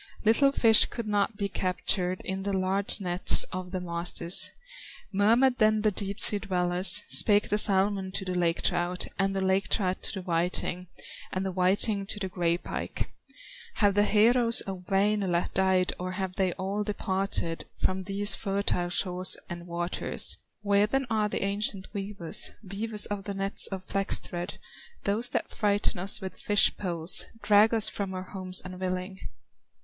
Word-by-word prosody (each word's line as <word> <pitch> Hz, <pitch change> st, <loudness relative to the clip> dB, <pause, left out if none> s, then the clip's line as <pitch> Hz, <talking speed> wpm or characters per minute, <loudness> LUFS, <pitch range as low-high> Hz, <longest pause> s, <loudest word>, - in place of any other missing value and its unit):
Little 275 Hz, +6 st, +4 dB
fish 225 Hz, -5 st, +5 dB
could 235 Hz, -2 st, -7 dB
not 205 Hz, 0 st, -1 dB
be 200 Hz, -1 st, -2 dB
captured 185 Hz, -1 st, -2 dB
In 190 Hz, 0 st, -4 dB
the 200 Hz, +1 st, -3 dB
large 190 Hz, +2 st, +1 dB
nets 180 Hz, -1 st, +2 dB
of 185 Hz, 0 st, -6 dB
the 185 Hz, 0 st, -4 dB
masters; 170 Hz, 0 st, +1 dB, 0.6 s
Murmured 235 Hz, +6 st, +2 dB
then 215 Hz, -1 st, +3 dB
the 215 Hz, -, +2 dB
deep 200 Hz, +1 st, 0 dB
sea 210 Hz, -3 st, +10 dB
dwellers, 180 Hz, -2 st, +3 dB
Spake 205 Hz, -1 st, +4 dB
the 210 Hz, -, +2 dB
salmon 195 Hz, -2 st, +2 dB
to 190 Hz, -, -3 dB
the 185 Hz, -, -3 dB
lake 175 Hz, -1 st, -1 dB
trout, 175 Hz, +1 st, 0 dB
And 195 Hz, 0 st, 0 dB
the 190 Hz, -1 st, -1 dB
lake 190 Hz, +1 st, 0 dB
trout 185 Hz, -3 st, -1 dB
to -, -, -3 dB
the 190 Hz, -, -5 dB
whiting, 180 Hz, +1 st, -1 dB, 0.4 s
And 185 Hz, +1 st, -3 dB
the 190 Hz, -, -3 dB
whiting 195 Hz, +2 st, +1 dB
to 205 Hz, -, -5 dB
the 190 Hz, -2 st, -4 dB
gray 170 Hz, -2 st, -1 dB
pike: -, -, -6 dB, 0.6 s
"Have 205 Hz, -2 st, +2 dB
the 205 Hz, -, +2 dB
heroes 230 Hz, +3 st, +4 dB
of 185 Hz, -2 st, -8 dB
Wainola 195 Hz, -3 st, 0 dB
Died, 190 Hz, -1 st, +1 dB
or 185 Hz, +1 st, -5 dB
have 185 Hz, -1 st, -5 dB
they 190 Hz, -3 st, 0 dB
all 195 Hz, +2 st, -4 dB
departed 195 Hz, -4 st, -3 dB
From 190 Hz, 0 st, -1 dB
these 200 Hz, +2 st, -1 dB
fertile 195 Hz, -3 st, -2 dB
shores 180 Hz, 0 st, +1 dB
and 175 Hz, 0 st, -8 dB
waters? 175 Hz, +1 st, -2 dB, 0.3 s
Where 200 Hz, 0 st, +2 dB
then 270 Hz, +4 st, -1 dB
are 215 Hz, -1 st, 0 dB
the -, -, -3 dB
ancient 200 Hz, -1 st, -3 dB
weavers, 195 Hz, -4 st, -1 dB
Weavers 210 Hz, +2 st, -1 dB
of 205 Hz, -1 st, -5 dB
the 200 Hz, -, -5 dB
nets 195 Hz, +1 st, -1 dB
of 190 Hz, -1 st, -7 dB
flax 195 Hz, 0 st, 0 dB
thread, 175 Hz, +1 st, -7 dB, 0.5 s
Those 220 Hz, +5 st, 0 dB
that -, -, -3 dB
frighten 205 Hz, -3 st, -1 dB
us 190 Hz, +3 st, -1 dB
with 190 Hz, -1 st, -8 dB
fish 205 Hz, -1 st, +4 dB
poles, 170 Hz, -3 st, +1 dB, 0.2 s
Drag 210 Hz, +1 st, +4 dB
us 225 Hz, -2 st, +3 dB
from 195 Hz, -2 st, -4 dB
our 185 Hz, -, -5 dB
homes 185 Hz, -1 st, +2 dB
unwilling?" 185 Hz, +1 st, -5 dB
195 Hz, 165 wpm, -27 LUFS, 185-205 Hz, 0.6 s, sea